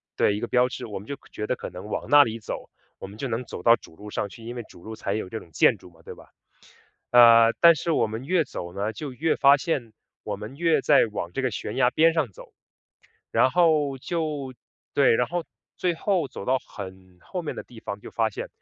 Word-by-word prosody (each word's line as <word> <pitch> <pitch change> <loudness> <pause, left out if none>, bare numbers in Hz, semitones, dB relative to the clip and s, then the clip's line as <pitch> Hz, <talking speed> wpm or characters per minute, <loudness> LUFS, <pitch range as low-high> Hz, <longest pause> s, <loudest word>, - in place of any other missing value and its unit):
对， 100 - +2
一 - - -3
个 120 - -3
标 125 +1 +3
志， - - -6
我 105 -3 -6
们 100 - -13
就 140 - -5
觉 105 - -5
得 - - 0
可 - - -8
能 90 +3 -9
往 - - -4
那 145 0 +9
里 115 -3 -4
走， 105 - -7 0.3
我 - - -7
们 100 +2 -12
就 135 - -3
能 120 +1 -2
走 - - -8
到 115 0 +7
主 - - -16
路 105 +4 -11
上 100 - -2
去， 115 - -13
因 120 +1 -6
为 120 - -4
主 85 - -16
路 110 0 -7
才 100 -2 -3
有 110 - -3
这 110 - -5
种 85 - -16
建 - - +4
筑 - - -15
嘛， 80 -1 -23
对 - - -9
吧？ - - -17 0.8
呃， 115 -1 +8
但 170 0 +8
是 165 - -4
我 - - +2
们 110 +3 -6
越 180 +2 +2
走 85 -11 -7
呢， 100 +3 -2
就 140 +3 -6
越 160 +6 0
发 140 +1 +6
现 135 -7 -3 0.3
我 105 - -3
们 105 +6 -9
越 165 0 +3
在 145 - +5
往 85 -4 -4
这 135 - -2
个 130 - +1
悬 105 -1 -5
崖 125 - +4
边 165 +5 +4
上 160 -7 0
走， - - -14 0.8
然 130 - +3
后 150 -3 +2
就 150 -3 -3 0.4
对， 140 -4 +5
然 125 +2 +2
后 175 -1 -2 0.3
最 180 -2 0
后 180 -2 0
走 - - -8
到 130 +3 +2
很 95 -5 -11
后 180 - -6
面 155 - -4
的 - - -6
地 120 - -15
方 100 -1 -6
就 - - -10
发 115 -1 +1
现， - - -6
120 Hz, 265 characters per minute, -25 LUFS, 105-145 Hz, 0.8 s, 那